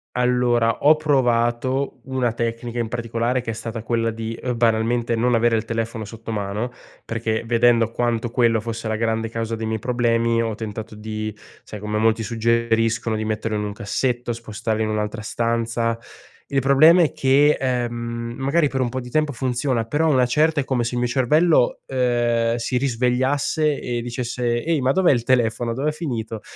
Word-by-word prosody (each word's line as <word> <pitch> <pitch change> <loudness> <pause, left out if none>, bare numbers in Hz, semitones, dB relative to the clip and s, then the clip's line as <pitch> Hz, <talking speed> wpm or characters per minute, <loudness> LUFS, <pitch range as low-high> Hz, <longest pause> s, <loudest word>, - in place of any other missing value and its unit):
Allora, 125 -2 +2
ho 155 +2 +6
provato 130 -2 +1
una 130 -3 -1
tecnica 115 +1 -3
in 115 -2 -2
particolare 120 +1 -1
che 120 -2 -4
è - - -4
stata 115 +1 -6
quella 115 0 0
di, 115 0 -5
uhm, 125 -2 -2
banalmente 115 +1 +1
non 120 +2 +2
avere 115 0 +3
il 110 - 0
telefono 115 0 -3
sotto 115 +2 -7
mano, 105 +3 -2 0.4
perché 110 -1 -2
vedendo 115 -1 +3
quanto 120 0 -1
quello 115 -2 +2
fosse 115 0 -5
la 110 - -1
grande 115 0 -1
causa 115 0 -3
dei 110 0 -4
miei 110 0 -2
problemi, 115 0 +1
ho 115 -1 -2
tentato 110 0 -6
di 110 0 -5 0.3
sai 105 - -9
com'è, 105 +1 -3
molti 110 +1 +2
suggeriscono 115 0 +1
di 110 - -2
metterlo 110 0 -2
in 105 - -1
un 105 - -3
cassetto, 120 +4 -2
di 115 - -4
spostarla 110 -1 -3
in 110 - -1
un'altra 105 0 -2
stanza. 115 +1 -1 0.5
Il 140 - +1
problema 155 +6 +6
è 155 - 0
che, 140 +3 +4
ehm, 125 -2 -1 0.4
magari 145 +4 +2
per 135 -1 -2
un 125 - 0
po' 130 - -3
di 125 -1 -8
tempo 155 +2 +1
funziona, 125 -2 -1
però 150 +7 +1
a - - +3
una 130 -4 +4
certa 155 +5 +2
è 135 - -1
come 130 -3 0
se 120 +1 -3
il - - 0
mio 125 - +1
cervello, 145 +3 +3
ehm, 120 -2 +1
si 120 +2 -3
risvegliasse 130 +4 +1
e 120 -1 -3
dicesse: 120 0 -2
"Ehi, 160 -1 0
ma 130 +1 +2
dov'è 180 +1 +4
il 120 -3 -1
telefono? 120 -2 +1
Dov'è 145 +5 -1
finito?" 115 -9 -4
120 Hz, 185 wpm, -22 LUFS, 115-125 Hz, 0.5 s, ho